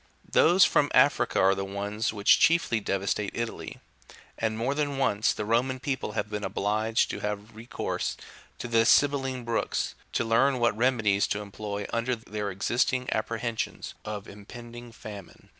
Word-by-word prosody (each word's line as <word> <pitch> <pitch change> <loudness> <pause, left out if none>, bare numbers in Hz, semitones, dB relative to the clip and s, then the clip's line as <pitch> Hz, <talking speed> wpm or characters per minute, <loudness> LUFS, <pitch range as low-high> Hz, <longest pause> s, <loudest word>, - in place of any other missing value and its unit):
3/ - - -25
Those 180 +4 +6
from 145 - +2
Africa 120 -4 +4
are 95 +1 +5
the 95 0 -3
ones 100 +3 -2
which 105 -2 +4
chiefly 165 -9 +3
devastate 100 0 -1
Italy; 115 -1 -4 0.6
and 110 -1 -2
more 125 +5 0
than 145 -1 -1
once 110 -6 +2
the 105 - -4
Roman 125 +4 +1
people 130 -6 -3
have - - -2
been 105 -1 -4
obliged 110 +3 0
to - - -5
have 105 +1 -5
recourse 115 +2 -4 0.4
to - - -5
the 115 -1 +3
Sibylline 135 -1 +3
Books, 115 -1 -1 0.2
to 120 - 0
learn 130 +4 +3
what 120 -4 +2
remedies 110 -4 +2
to 105 - -2
employ 105 0 -5
under 115 +2 0
their 105 -2 -5
existing 125 +6 0
apprehensions 115 +1 -3
of 105 -2 -6
impending 120 +3 -11
famine. 105 -5 -11
115 Hz, 160 wpm, -27 LUFS, 105-125 Hz, 0.6 s, Those